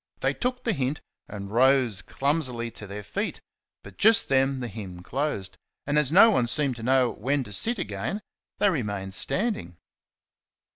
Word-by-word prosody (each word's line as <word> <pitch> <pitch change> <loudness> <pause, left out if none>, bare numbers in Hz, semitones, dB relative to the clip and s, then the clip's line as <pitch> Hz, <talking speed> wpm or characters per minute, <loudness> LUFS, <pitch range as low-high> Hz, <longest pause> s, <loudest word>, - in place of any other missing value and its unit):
They - - +2
took 250 0 -2
the 230 - +1
hint 140 -1 -1 0.3
and 100 -1 -7
rose 125 -3 +3
clumsily 130 -4 -1
to 105 - -9
their 100 +1 -7
feet, - - -3 0.4
but 100 -2 -13
just 225 +1 +5
then 135 0 +2
the 125 - -3
hymn 95 -5 -8
closed, 125 -6 -2 0.3
and, 145 +1 +2
as 145 -2 +1
no 205 +6 +8
one 125 - +2
seemed 135 0 -1
to - - -8
know 125 +1 +3
when 140 +1 -1
to 100 -4 -7
sit 230 - +2
again, 180 - -3 0.3
they 205 - +3
remained 100 - -3
standing. 185 - -2
130 Hz, 165 wpm, -26 LUFS, 105-150 Hz, 0.4 s, no